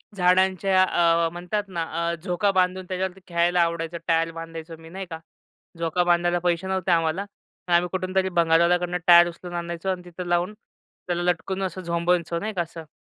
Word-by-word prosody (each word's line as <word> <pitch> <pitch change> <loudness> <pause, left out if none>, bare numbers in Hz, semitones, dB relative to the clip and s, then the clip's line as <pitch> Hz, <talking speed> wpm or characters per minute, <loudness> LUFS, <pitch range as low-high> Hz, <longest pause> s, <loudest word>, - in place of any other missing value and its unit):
झाडांच्या 185 +1 +3
अ, 170 -2 +2
म्हणतात 180 +4 -3
ना 170 -3 -3 0.3
अ, - - -2
झोका 180 +3 0
बांधून 185 0 +1
त्याच्यावरती 185 +1 -4
खेळायला 175 +1 +2
आवडायचं, 170 0 -1
टायर 165 0 +2
बांधायचो 165 0 -8
मी, 160 0 -14
नाही 190 +2 -6
का? 160 -1 -6 0.6
झोका 170 +2 0
बांधायला 175 0 +2
पैसे 175 +1 0
नव्हते 190 -1 -1
आम्हाला. 165 +3 +1 0.4
तर - - -1
आम्ही 175 +1 +4
कुठूनतरी 185 0 0
भंगारवाल्याकडून 175 +1 +2
टायर 175 0 +8
उचलून 175 +1 -9
आणायचो 170 +2 -4
अन् 180 -1 -3
तिथं 180 0 -8
लावून 175 +3 0 0.5
त्याला 175 -1 -1
लटकून 180 +2 -1
असं 190 0 -3
झोंबायचो 170 -1 0
नाही 215 +4 -3
का 175 - +1
असं. 165 -1 -10
175 Hz, 170 wpm, -24 LUFS, 170-185 Hz, 0.6 s, टायर